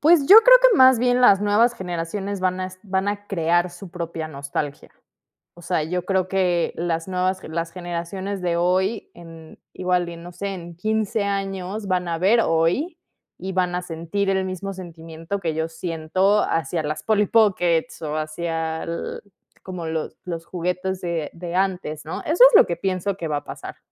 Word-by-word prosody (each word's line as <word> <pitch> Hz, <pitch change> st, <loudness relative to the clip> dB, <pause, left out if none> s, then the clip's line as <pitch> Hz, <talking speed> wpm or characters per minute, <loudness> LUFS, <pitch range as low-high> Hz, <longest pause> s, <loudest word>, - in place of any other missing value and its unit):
Pues, 310 Hz, -2 st, +5 dB
yo 415 Hz, -, +11 dB
creo -, -, +8 dB
que -, -, +6 dB
más 260 Hz, -4 st, +7 dB
bien 245 Hz, +1 st, +2 dB
las 200 Hz, -5 st, +6 dB
nuevas 215 Hz, +4 st, +3 dB
generaciones 190 Hz, +1 st, -4 dB
van 185 Hz, 0 st, 0 dB
a 185 Hz, -, -2 dB
est 185 Hz, 0 st, -12 dB
a -, -, -18 dB
van 190 Hz, +1 st, 0 dB
a 205 Hz, 0 st, -4 dB
crear 175 Hz, -2 st, +1 dB
su 175 Hz, +1 st, -11 dB
propia 165 Hz, -2 st, -5 dB
nostalgia. 140 Hz, 0 st, -5 dB, 0.7 s
O 175 Hz, -, -14 dB
sea, 170 Hz, -2 st, -1 dB
yo 180 Hz, +2 st, -3 dB
creo 190 Hz, -1 st, +1 dB
que 180 Hz, -3 st, +1 dB
las 165 Hz, 0 st, -2 dB
nuevas 185 Hz, 0 st, 0 dB
gen 160 Hz, -, -9 dB
las 165 Hz, 0 st, -2 dB
generaciones 180 Hz, +2 st, -5 dB
de 175 Hz, -1 st, 0 dB
hoy 185 Hz, +5 st, 0 dB
en 165 Hz, -2 st, -13 dB, 0.2 s
igual, 180 Hz, -1 st, 0 dB
y 170 Hz, -, -8 dB
no 170 Hz, +1 st, -10 dB
sé, 190 Hz, +3 st, -5 dB
en 170 Hz, -2 st, -9 dB
15 215 Hz, +3 st, -1 dB
años 195 Hz, 0 st, -3 dB
van 180 Hz, -1 st, 0 dB
a 165 Hz, -, -1 dB
ver 200 Hz, +7 st, +4 dB
hoy, 180 Hz, -, +1 dB, 0.4 s
y 190 Hz, +1 st, -5 dB
van 180 Hz, -1 st, 0 dB
a 180 Hz, -, -1 dB
sentir 180 Hz, +4 st, -3 dB
el 190 Hz, -1 st, +1 dB
mismo 190 Hz, +1 st, -5 dB
sentimiento 165 Hz, 0 st, -7 dB
que 165 Hz, -4 st, -2 dB
yo 160 Hz, 0 st, -1 dB
siento 170 Hz, +5 st, 0 dB
hacia 165 Hz, 0 st, -1 dB
las 150 Hz, +1 st, -4 dB
Polly 210 Hz, -1 st, +2 dB
Pockets, 185 Hz, -8 st, +2 dB
o 155 Hz, 0 st, -3 dB
hacia 160 Hz, +1 st, -3 dB
al 170 Hz, +5 st, -5 dB, 0.4 s
como 180 Hz, -3 st, -6 dB
los 160 Hz, -1 st, -4 dB
los 170 Hz, -2 st, -5 dB
juguetes 180 Hz, +2 st, -3 dB
de 170 Hz, -4 st, -3 dB
de 170 Hz, 0 st, -6 dB
antes, 180 Hz, -5 st, -1 dB
¿no? 160 Hz, -, -5 dB
Eso 330 Hz, +10 st, +4 dB
es -, -, +1 dB
lo -, -, +8 dB
que 170 Hz, -, -1 dB
pienso 190 Hz, +1 st, -2 dB
que 170 Hz, -, -4 dB
va 150 Hz, -1 st, -1 dB
a -, -, -6 dB
pasar. -, -, -9 dB
180 Hz, 195 wpm, -22 LUFS, 165-195 Hz, 0.7 s, yo